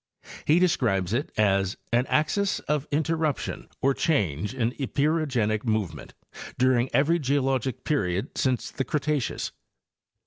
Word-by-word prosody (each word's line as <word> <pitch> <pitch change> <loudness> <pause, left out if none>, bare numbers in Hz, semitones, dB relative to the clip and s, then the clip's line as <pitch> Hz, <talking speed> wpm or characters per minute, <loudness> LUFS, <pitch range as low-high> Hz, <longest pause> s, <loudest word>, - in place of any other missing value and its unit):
He 155 - +4
describes 115 - +2
itt 130 +5 -1
as 100 -2 +2 0.2
"an 120 +2 +3
axis 195 +6 +1
of 150 -1 -1
interruption 155 0 -1
or 135 +1 +4
change 105 - 0
in 120 -3 0
epeirogenic 135 -7 0
movement 105 - -2 0.4
during 130 0 +3
every 150 +7 +3
geologic 135 -3 0
period 95 - -1
since 130 -3 0
the 135 - -2
Cretaceous." 150 -3 -1
130 Hz, 115 wpm, -26 LUFS, 110-150 Hz, 0.4 s, He